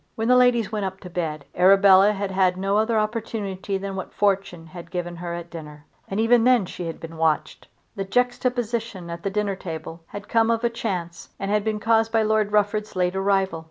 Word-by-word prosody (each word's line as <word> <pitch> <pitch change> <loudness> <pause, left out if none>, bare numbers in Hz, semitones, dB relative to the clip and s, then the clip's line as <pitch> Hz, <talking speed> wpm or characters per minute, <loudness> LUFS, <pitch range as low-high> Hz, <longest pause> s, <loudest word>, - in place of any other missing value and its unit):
When 225 +1 -1
the 250 - +6
ladies 245 -4 +3
went 210 -2 -2
up 190 0 -5
to 180 - -10
bed 155 -4 -3
Arabella 195 +2 +6
had 200 -1 -3
had 185 -1 +2
no 195 +1 0
other 220 +1 +2
opportunity 215 -3 -2
than 195 0 -5
what 190 - -6
Fortune 195 -4 0
had 170 +1 -11
given 175 -1 -4
her 170 0 -5
at 170 0 -8
dinner. 150 -3 -10 0.2
And 195 - -3
even 230 +1 +4
then 250 -4 +4
she 175 -1 -6
had 165 - -6
been 165 0 -9
watched. 160 -1 -1 0.3
That 195 -1 -5
juxtaposition 235 -5 -1
at 170 0 -6
the 195 - -2
dinner 200 0 -1
table 165 -2 -7
had 205 0 -9
come 225 -1 +2
of 230 +1 +1
chance 180 -7 -4
and 195 +1 -3
had 210 0 +1
been 215 -1 -1
caused 225 +1 +2
by 225 -1 +3
Lord 215 -1 +1
Rufford's 210 0 0
late 180 0 0
arrival. 195 -3 +1
195 Hz, 205 wpm, -23 LUFS, 180-220 Hz, 0.3 s, the